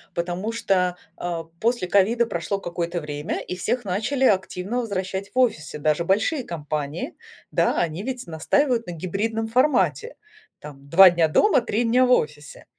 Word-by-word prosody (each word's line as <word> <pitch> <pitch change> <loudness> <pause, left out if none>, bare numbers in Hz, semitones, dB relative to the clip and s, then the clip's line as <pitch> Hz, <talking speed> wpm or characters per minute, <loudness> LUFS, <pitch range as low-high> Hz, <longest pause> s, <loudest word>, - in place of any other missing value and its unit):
потому 175 +5 -2
что, 180 -5 0 0.2
а, 170 -2 -3 0.2
после 230 -5 0
ковида 210 +6 +3
прошло 195 0 -3
какое-то 175 -1 -3
время, 150 0 -4
и - - -5
всех 240 +6 -2
начали 220 +9 0
активно 195 +1 0
возвращать 190 -3 -3
в - - -7
офисы, 210 -13 +1
даже 155 +2 +1
большие 215 - +1
компании. 155 - -4 0.4
Да, - - +1
они 165 +1 -1
ведь 250 +2 -5
настаивают 230 - 0
на - - -4
гибридном 220 +6 -3
формате, 295 - +1 0.4
там, 140 -1 -12
2 185 +3 +8
дня 170 -2 +2
дома, 265 - +3
3 235 0 -1
дня 245 +3 +3
в - - +1
офисе. 150 -7 -1
190 Hz, 155 wpm, -23 LUFS, 170-230 Hz, 0.4 s, 2